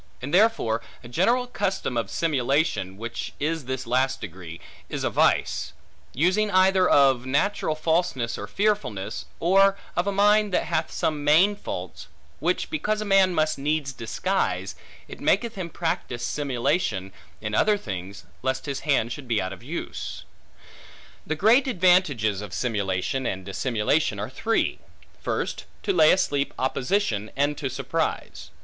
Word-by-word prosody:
And 140 +5 -6
therefore 180 - +3 0.2
a - - -9
general 230 - +2
custom 195 - -2
of 115 -4 -1
simulation 140 - 0
(which 115 +2 -5
is 155 -1 -1
this 130 0 -3
last 130 +3 +1
degree) 85 -3 -8 0.3
is - - -3
a - - 0
vice, - - +1 0.4
using 185 - +2
either 185 -1 +4
of 135 -3 +5
a - - -10
natural 155 +3 +1
falseness 155 -7 0
or - - -6
fearfulness, 105 - -1
or 195 +3 +4 0.2
of 175 +3 0
a - - +2
mind 210 +1 +4
that - - +2
hath 160 0 -1
some 150 -2 -1
main 170 +8 +5
faults, - - -7 0.3
which - - -1
because 215 -9 -1
a 215 - -3
man 195 -2 +4
must 155 -2 +1
needs 145 -1 -1
disguise, 185 +12 -1 0.3
it - - -10
maketh 235 -2 +2
him 185 -3 -5
practise 130 -8 -3
simulation 135 - -1 0.3
in 105 -1 -5
other 210 - +3
things, 100 - -7 0.2
lest 130 +1 -1
his 140 -2 -3
hand 135 -6 +1
should 135 0 -7
be 115 -2 +1
out 95 0 -3
of 95 - -12
use. 150 +8 -6 1.0
The 155 - -1
great 225 - +4
advantages 175 - +3
of 100 -4 -7
simulation 105 +5 -1
and 95 0 -4
dissimulation 110 +3 0
are 105 +5 -4
three. 225 +11 0 0.4
First, - - -3 0.2
to 200 - +1
lay 160 -3 +6
asleep 145 -6 +1
opposition, 130 - 0
and 145 +2 +1
to 135 - -2
surprise. - - -3
145 Hz, 150 wpm, -25 LUFS, 115-190 Hz, 1.0 s, lay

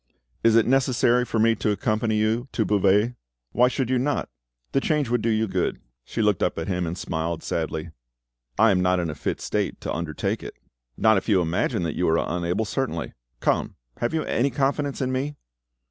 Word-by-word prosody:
Is 115 -1 +5
it 115 - +5
necessary 125 -2 +3
for 115 - -2
me 115 +1 +4
to 105 - 0
accompany 110 +2 0
you 110 +4 +1
to 110 - +1
Beauvais?" 105 +3 +3 0.4
"Why 125 +1 +4
should 125 0 -1
you 130 - +3
not? 145 +3 -1 0.4
The 135 - +2
change 150 -5 0
would 120 -1 +1
do 115 - 0
you 110 0 +1
good." - - -1 0.3
She 115 - -2
looked 105 -4 +2
up - - 0
at 80 - -3
him 90 -2 -1
and 85 +2 -4
smiled 80 -1 -3
sadly. 80 0 -3 0.7
"I 110 +1 +6
am 90 -2 +2
not 90 0 +2
in 85 -3 -1
a - - -5
fit - - -3
state - - -2
to - - -3
undertake 80 -3 -2
it." - - -8 0.4
"Not 110 -1 +4
if 95 - -3
you 100 -3 +5
imagine 85 +1 0
that 80 -3 -1
you 90 - +1
are 80 - +3
unable, 90 +6 -1
certainly. 105 - -3 0.3
Come, - - 0 0.2
have 120 - -1
you 160 -1 0
any 130 +5 +1
confidence 140 +2 -1
in 130 -1 0
me?" 140 +3 -2
110 Hz, 205 wpm, -24 LUFS, 90-125 Hz, 0.7 s, I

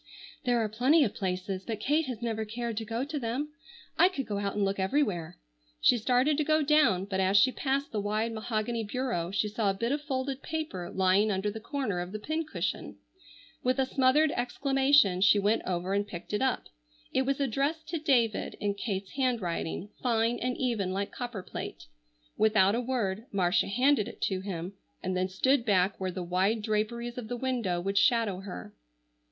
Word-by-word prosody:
"There 245 -1 +3
are 220 - +1
plenty 255 +9 +4
of 215 - -1
places, 185 0 -3
but 220 -1 -4
Kate 295 +6 +1
has 240 -3 -5
never 220 -2 -1
cared 230 +1 -4
to 225 - -2
go 230 +3 -2
to 295 0 -4
them. 255 +5 -2 0.5
I 360 +3 +7
could 275 -8 -4
go 205 -1 -3
out 200 -1 -2
and 205 -1 +1
look 195 0 -1
everywhere." 190 - 0 0.4
She - - +5
started 255 +6 +2
to - - +3
go 310 +1 +2
down, 275 -11 +3
but 195 -1 -2
as 190 +1 +3
she 255 +6 +6
passed 275 +2 -1
the 210 - -1
wide 215 +3 -1
mahogany 225 +1 -2
bureau 215 -6 -2
she 205 +2 0
saw 210 0 0
a 195 - 0
bit 230 +5 -1
of 290 +1 0
folded 270 -2 -3
paper 310 - -4
lying 190 +3 +3
under 200 +1 0
the 220 - -6
corner 240 -6 -2
of 180 +2 -5
the - - -2
pincushion. 310 +7 -3 0.6
With 255 +1 +1
a 265 - +2
smothered 270 +4 +3
exclamation 265 -6 +3
she 200 +1 +6
went 205 +3 +2
over 180 +1 -1
and 200 +1 0
picked 180 0 -8
it 210 - 0
up. 265 -1 0 0.5
It - - +3
was 275 +1 0
addressed 280 +5 -1
to 330 - -2
David 245 -7 +1
in 205 -1 0
Kate's 200 -2 -4
handwriting, 210 -8 -2
fine 230 -1 +1
and 250 0 -2
even 225 -8 -1
like 200 +2 -2
copperplate. 240 -7 -6 0.5
Without 215 -2 +4
a 235 - 0
word 230 -3 -2
Marcia 180 -2 +2
handed 250 +1 +3
it - - -10
to 190 -2 0
him, 185 -1 -5 0.3
and 185 0 -1
then 185 +1 0
stood 260 +7 +2
back 195 -3 +2
where 190 -1 -1
the 180 0 -4
wide 190 +5 +1
draperies 235 +3 -2
of 230 - -7
the 245 +2 -3
window 235 -9 -1
would 195 +3 +1
shadow 220 -4 +2
her. 190 - -8
220 Hz, 190 wpm, -29 LUFS, 195-260 Hz, 0.6 s, I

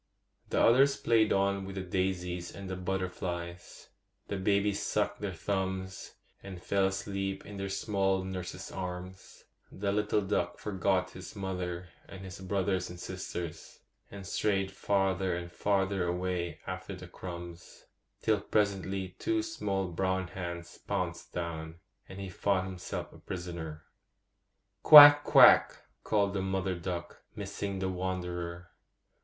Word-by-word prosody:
The - - +1
others 135 +4 +5
played 110 -2 +3
on 100 0 +2
with 95 0 -7
the 95 - -3
daisies 90 -1 -2
and 100 -1 -7
the 95 - -3
butterflies; 90 -2 -4 0.4
the - - -2
babies 100 +1 +1
sucked - - -1
their 100 -2 -2
thumbs 95 +1 -3 0.3
and 95 -2 -8
fell 95 +2 +1
asleep 95 0 -3
in 100 0 -8
their 95 0 -3
small 95 -1 0
nurses' 95 -1 -6
arms; 90 0 -7 0.3
the 100 +1 -2
little 105 +1 +1
duck 90 -3 -1
forgot 95 -2 0
his 95 +2 -10
mother 90 -2 -4 0.2
and 95 - -9
his 95 0 -8
brothers 95 -1 -1
and 90 0 -9
sisters, 90 -3 -6 0.3
and 100 -1 -9
strayed 95 0 0
farther 95 -2 +1
and 85 0 -6
farther 95 -1 +1
away 90 0 -2
after - - -5
the - - -10
crumbs, 85 -1 -9 0.4
till 110 -2 +2
presently 100 -2 0
two 335 -1 0
small 100 - -2
brown 95 +1 -1
hands 85 -2 -6
pounced 90 -4 -3
down, 80 -2 -4 0.3
and 95 - -8
he 100 - -5
found 95 +1 0
himself 95 -1 -6
a - - -14
prisoner. 85 -4 -6 1.0
'Quack! 145 -1 +11
quack!' - - +7 0.3
called 100 -2 +1
the 95 - -1
mother 95 0 -1
duck, 85 -1 -5
missing 100 -1 -4
the 95 0 -1
wanderer. 90 -2 -4
95 Hz, 135 wpm, -31 LUFS, 90-100 Hz, 1.0 s, Quack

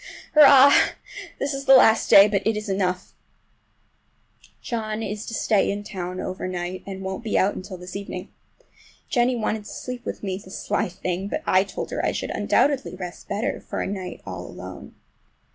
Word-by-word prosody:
Hurrah! 280 -2 +8 0.6
This 280 +1 -2
is 275 0 -5
the 270 - +8
last 225 -3 +5
day, 200 +1 +9
but 200 -2 0
it 220 -1 +1
is 210 +1 -5
enough. 185 -2 -1 1.5
John 220 -2 -4
is 210 +1 -5
to 225 - -4
stay 210 -3 +2
in 205 +1 -3
town 185 -2 -6
over 185 0 -4
night, 180 0 -4
and 190 -1 -6
won't 190 +4 -5
be 220 - 0
out 195 - +3
until 185 0 -8
this 180 +1 -10
evening. 195 -2 -6 0.8
Jennie 245 0 +2
wanted 215 -2 -2
to - - -9
sleep 250 -1 -6
with - - -6
me—the 190 -1 -5
sly 190 - -2
thing! 180 +2 -4
but - - -4
I 185 +1 +4
told 195 - -6
her - - -2
I - - +1
should - - -4
undoubtedly 275 -8 +1
rest 180 -2 -8
better 205 +4 -2
for - - -6
a - - -1
night 190 -2 -6
all 90 -2 -7
alone. - - -10
200 Hz, 180 wpm, -24 LUFS, 185-225 Hz, 1.5 s, day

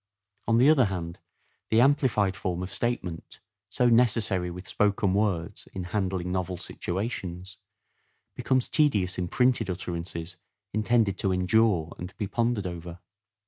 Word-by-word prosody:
On 115 - +3
the 125 +4 +5
other 150 -5 +6
hand, 85 -4 -4 0.5
the 110 - +4
amplified 125 -7 +3
form 90 -2 -3
of 90 - -6
statement, 110 -9 -3 0.3
so 125 - +2
necessary 110 -6 +2
with 90 +2 -8
spoken 100 -2 +1
words 100 -2 -1
in 95 - -4
handling 95 -3 -1
novel 90 0 -2
situations, 95 0 -4 0.8
becomes 130 -1 0
tedious 100 - +2
in 90 - -1
printed 125 0 +2
utterances 85 -1 -5 0.4
intended 110 -2 +2
to 95 - +1
endure 90 -2 +2
and 90 +1 -8
be 105 - -2
pondered 115 0 0
over. 85 -1 -6
95 Hz, 135 wpm, -27 LUFS, 90-115 Hz, 0.8 s, other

